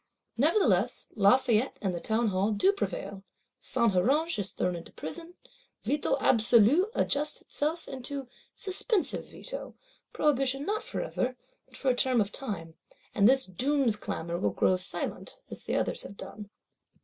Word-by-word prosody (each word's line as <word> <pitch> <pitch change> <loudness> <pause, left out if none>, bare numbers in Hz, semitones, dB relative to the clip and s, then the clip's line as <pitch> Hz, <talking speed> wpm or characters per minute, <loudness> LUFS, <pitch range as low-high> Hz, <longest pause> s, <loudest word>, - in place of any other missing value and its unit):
Nevertheless 245 - +2
Lafayette 230 +3 +3
and 190 -3 -1
the 175 - -3
Townhall 215 -1 +1
do 375 - +4
prevail: 200 - -4 0.4
Saint 235 -3 +3
Huruge 280 - +2
is 200 -1 -2
thrown 180 -1 -1
into 170 - -9
prison; 330 - -7 0.5
Veto 295 0 +1
Absolu 240 - +4
adjusts 295 +1 +1
itself 315 +3 -3
into 270 +1 -5 0.3
Suspensive 390 +1 0
Veto, - - -8 0.4
prohibition 275 -1 +1
not 430 +4 -1
forever, 255 - -3 0.3
but - - -15
for 270 - 0
a 250 - +3
term 255 -1 +2
of 205 -1 0
time; 170 -11 -4 0.4
and 200 +3 +5
this 265 0 +3
doom's 255 +5 +1
clamour 170 -4 -4
will - - +1
grow 185 - +2
silent, 185 +1 -3
as - - -6
the - - -1
others - - 0
have 200 - -9
done. 210 -1 -8
250 Hz, 145 wpm, -29 LUFS, 200-290 Hz, 0.5 s, and